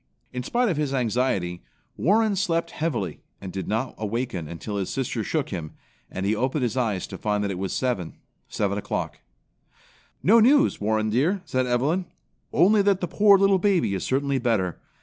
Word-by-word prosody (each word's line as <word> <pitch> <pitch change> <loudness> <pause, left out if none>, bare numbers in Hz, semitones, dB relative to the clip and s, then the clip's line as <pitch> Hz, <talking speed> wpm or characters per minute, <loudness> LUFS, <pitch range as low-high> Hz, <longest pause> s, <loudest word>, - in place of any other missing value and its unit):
In 125 - -3
spite 240 - 0
of 175 -8 0
his 145 -2 -1
anxiety, 110 -8 0 0.3
Warren 215 +4 +2
slept 170 -3 0
heavily 120 - -2 0.2
and 95 -3 -8
did 95 - -4
not 115 +5 -1
awaken 110 -5 -3
until 85 +6 -5
his 95 -2 -2
sister 125 -4 -2
shook 150 +4 -1
him, 85 -5 -5 0.4
and 95 - -4
he 105 +2 +2
opened 130 +4 -1
his 120 -1 -1
eyes 110 -8 0
to - - -9
find 105 -1 0
that 100 - -1
it 90 - -5
was 95 -1 -3
seven, 120 -11 -2 0.3
7 100 -1 -1
o'clock. - - -4 1.0
"No 225 +5 +6
news, 280 - +4
Warren 110 +1 +1
dear," 170 - +1
said 130 -3 0
Evelyn. 145 +10 +1 0.5
"Only 205 +4 +5
that 200 -2 +2
that 180 - -2
poor 205 -1 +6
little 195 0 +4
baby 180 - +2
is 95 - -2
certainly 140 +1 0
better. 110 -8 0
125 Hz, 180 wpm, -25 LUFS, -, 1.0 s, No